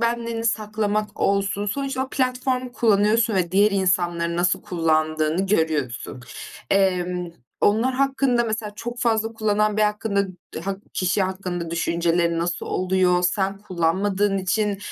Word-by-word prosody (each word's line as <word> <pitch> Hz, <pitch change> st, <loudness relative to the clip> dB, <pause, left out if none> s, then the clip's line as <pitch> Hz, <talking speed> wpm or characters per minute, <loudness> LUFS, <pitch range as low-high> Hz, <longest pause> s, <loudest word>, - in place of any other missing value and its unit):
benliğini 235 Hz, -1 st, -1 dB
saklamak 215 Hz, -1 st, -1 dB
olsun, 200 Hz, 0 st, +1 dB
sonuçta 270 Hz, +4 st, -2 dB
o -, -, -12 dB
platformu 255 Hz, -1 st, -1 dB
kullanıyorsun 220 Hz, 0 st, +3 dB
ve 180 Hz, -3 st, 0 dB
diğer 205 Hz, +2 st, +5 dB
insanların 175 Hz, -3 st, 0 dB
nasıl 175 Hz, 0 st, +1 dB
kullandığını 155 Hz, +1 st, 0 dB
görüyorsun. 150 Hz, -, -1 dB, 0.5 s
Emm, 180 Hz, -2 st, +1 dB, 0.3 s
onlar 225 Hz, +5 st, +3 dB
hakkında 265 Hz, -2 st, +2 dB
mesela 220 Hz, -2 st, -3 dB
çok 240 Hz, +3 st, -6 dB
fazla 225 Hz, -1 st, +1 dB
kullanan 215 Hz, -1 st, +1 dB
biri 215 Hz, -, +4 dB
hakkında, 210 Hz, -1 st, 0 dB, 0.4 s
hak 195 Hz, 0 st, -3 dB, 0.2 s
kişi 185 Hz, +2 st, +1 dB
hakkında 185 Hz, -3 st, -3 dB
düşüncelerin 170 Hz, 0 st, +1 dB
nasıl 170 Hz, +1 st, -2 dB
oluyor? 185 Hz, -1 st, +2 dB
Sen 195 Hz, +2 st, 0 dB
kullanmadığın 195 Hz, +2 st, 0 dB
için, 200 Hz, +2 st, 0 dB
200 Hz, 125 wpm, -23 LUFS, 175-220 Hz, 0.5 s, diğer